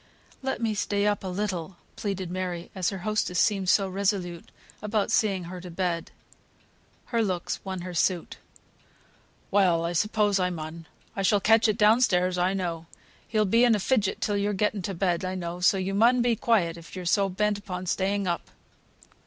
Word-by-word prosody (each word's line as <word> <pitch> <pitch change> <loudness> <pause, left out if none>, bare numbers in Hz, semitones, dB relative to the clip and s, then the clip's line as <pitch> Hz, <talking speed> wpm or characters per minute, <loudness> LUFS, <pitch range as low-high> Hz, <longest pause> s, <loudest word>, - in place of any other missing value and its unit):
"Let 265 0 -2
me 225 -1 +1
stay 205 0 0
up 205 -1 +1
a - - -4
little," 185 -2 -3 0.2
pleaded 190 -4 -4
Mary, 180 -2 -4
as 185 -3 0
her 195 - -5
hostess 215 -4 0
seemed 195 -4 +2
so 195 0 +4
resolute 185 -3 -2 0.3
about 210 0 -1
seeing 200 -5 +2
her 180 +1 -8
to 180 - -9
bed. 170 -1 -2 1.0
Her 230 - +3
looks 185 -4 -3
won 190 -2 -5
her 180 0 -6
suit. 175 0 0 1.1
"Well, 180 -5 +3
I 170 - -2
suppose 205 +2 +2
I 180 0 +1
mun. 165 -1 -7 0.3
I 195 - -2
shall 205 +1 +3
catch 225 +3 +4
it 215 -1 +1
down 220 +3 +5
stairs, 180 -5 +2
I 185 +2 +1
know. 170 -3 -3 0.4
He'll 215 -1 +1
be 230 +5 +4
in 240 -2 +5
a - - -1
fidget 210 -1 0
till 205 -1 0
you're 205 +1 0
getten 210 +1 0
to 190 +2 -4
bed, 175 0 0
I 185 0 -2
know; 175 -1 -5
so 185 +2 +4
you 190 +1 -2
mun 235 +4 +4
be 240 -1 +2
quiet 190 -8 +1
if 170 +2 -12
you 185 - -5
are - - -9
so 195 +3 +2
bent 205 +2 0
upon 185 -2 -6
staying 195 +2 0
up." 175 -2 -2
190 Hz, 195 wpm, -27 LUFS, 180-210 Hz, 1.1 s, down